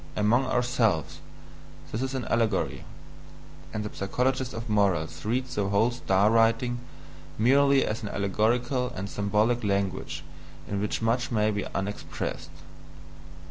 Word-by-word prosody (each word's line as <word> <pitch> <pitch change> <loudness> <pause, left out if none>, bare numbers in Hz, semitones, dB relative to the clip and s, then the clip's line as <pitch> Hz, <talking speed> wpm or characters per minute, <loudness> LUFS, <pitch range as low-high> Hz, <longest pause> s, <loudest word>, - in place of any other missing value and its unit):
Among 115 +5 +3
ourselves, 120 - +1 0.7
this 110 - -2
is 130 0 -2
an 130 -3 -2
allegory; 115 -4 0 0.9
and 105 - -3
the 105 - -7
psychologist 130 +6 0
of 115 +1 -6
morals 100 -7 +1
reads 125 +4 -1
the 100 -1 0
whole 100 +4 +3
star 105 -4 +2
writing 115 +2 +3 0.6
merely 140 +4 +4
as 110 +1 -3
an 105 - -4
allegorical 120 +6 0
and 95 +2 -4
symbolic 105 +4 +1
language 100 -2 -1 0.4
in 100 0 -2
which 105 +2 -2
much 120 +2 +1
may 110 -1 +2
be 105 -1 -2
unexpressed. 100 +1 -4
110 Hz, 130 wpm, -27 LUFS, 100-125 Hz, 0.9 s, merely